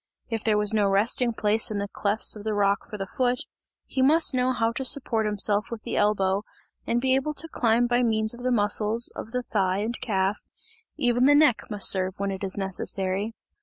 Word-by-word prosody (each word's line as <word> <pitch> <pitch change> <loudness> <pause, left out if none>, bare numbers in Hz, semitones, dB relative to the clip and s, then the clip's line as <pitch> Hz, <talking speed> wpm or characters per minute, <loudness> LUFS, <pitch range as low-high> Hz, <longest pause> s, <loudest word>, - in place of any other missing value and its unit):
If 225 -2 -3
there 215 -2 +2
was 210 0 +1
no 210 -2 +2
resting 225 +5 +1
place 220 0 +1
in 215 - -3
the 200 0 -2
clefts 205 +2 +1
of 210 - -9
the 215 -1 -2
rock 200 +1 0
for 210 - -6
the 195 - -4
foot, 245 +4 -1 0.4
he 265 - -3
must 305 +3 +3
know 255 0 +1
how 230 -2 0
to 250 +3 -4
support 235 -4 +1
himself 210 0 +1
with 230 -2 -7
the - - -4
elbow, 200 -1 +1 0.4
and 235 - +1
be 260 +1 +2
able 270 +3 0
to 330 - -4
climb 235 -5 +1
by 240 0 +1
means 220 -2 +1
of 240 - -11
the 255 - -1
muscles 215 0 0
of - - -7
the 250 +1 -3
thigh 190 -5 0
and 220 +3 -3
calf, 195 -2 -1 0.6
even 245 0 +2
the 290 +1 +6
neck 290 -6 +3
must 210 -2 +3
serve 185 -1 -1
when 200 0 -2
it 190 0 -6
is 195 0 -3
necessary. 195 +2 -2
220 Hz, 215 wpm, -25 LUFS, 200-245 Hz, 0.6 s, the